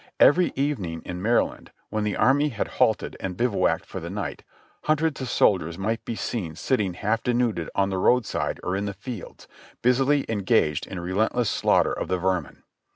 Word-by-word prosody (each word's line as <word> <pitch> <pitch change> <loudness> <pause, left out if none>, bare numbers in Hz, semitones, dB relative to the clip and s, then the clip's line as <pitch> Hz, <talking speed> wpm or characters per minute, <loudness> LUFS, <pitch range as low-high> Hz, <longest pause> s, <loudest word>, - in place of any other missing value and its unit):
Every 175 +3 +6
evening 105 - -2
in 90 0 -5
Maryland, 115 +4 0 0.2
when 110 0 -1
the 105 -1 -1
army 145 +3 +3
had 115 -6 -3
halted - - +2
and 90 -2 -4
bivouacked 120 -3 +1
for - - -6
the - - -6
night, - - -5 0.4
hundreds 155 -2 +1
of 130 - -3
soldiers 85 -8 +2
might 110 +4 -2
be 115 - -3
seen 90 -9 -3
sitting 100 - 0
half 110 +4 0
denuded 120 -9 0
on 100 0 +2
the 95 - -1
road 125 +4 +3
side - - -2
or 90 - -1
in 100 +1 -1
the 100 -1 -4
fields, 120 -6 -8 0.4
busily 135 +3 +3
engaged 95 -8 +1
in 95 - -6
a - - -4
re 90 +2 -4
lentless 110 +3 +1
slaughter - - +2
of - - -3
the 95 - 0
vermin. 90 -3 -2
105 Hz, 190 wpm, -25 LUFS, 95-125 Hz, 0.4 s, Every